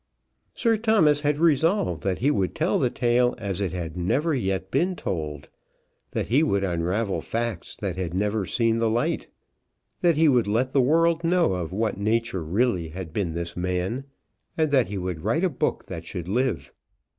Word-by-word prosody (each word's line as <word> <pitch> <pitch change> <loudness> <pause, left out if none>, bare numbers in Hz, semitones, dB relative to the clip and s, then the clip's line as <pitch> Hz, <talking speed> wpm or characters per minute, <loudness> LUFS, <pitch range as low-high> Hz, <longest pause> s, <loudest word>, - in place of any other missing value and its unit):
Sir 230 -2 +2
Thomas 205 -10 +3
had 145 0 +1
resolved 160 - +2
that 95 +1 -1
he 140 +5 +2
would 95 -8 -1
tell - - +1
the - - +2
tale 120 +1 +2
as 100 -3 -3
it 95 -4 -1
had 85 -2 -5
never 135 - 0
yet 95 -6 -2
been 185 +2 +1
told, 75 - -4 0.6
that - - -2
he 130 +6 +4
would 100 -11 +1
unravel 95 +4 -1
facts 115 -6 -4
that 95 -3 -4
had 90 -3 -2
never 105 +2 0
seen 115 +3 +1
the 115 -1 +2
light, 115 +2 0 0.7
that 170 -3 +3
he 160 0 +5
would 125 -6 +3
let 120 +5 +1
the 135 - +4
world 165 +5 +3
know 170 - +3
of 90 -2 -3
what 105 +1 -1
nature 110 -3 0
really 90 0 0
had 80 0 -8
been 95 -6 -1
this 85 0 -4
man, 90 +8 -2 0.5
and 155 -2 +1
that 130 -4 +4
he 100 +1 -4
would 90 -3 -4
write 115 - 0
a 185 - +3
book 135 - -1
that 80 - -7
should 85 0 -6
live. 125 +6 -1
110 Hz, 185 wpm, -25 LUFS, 90-140 Hz, 0.7 s, he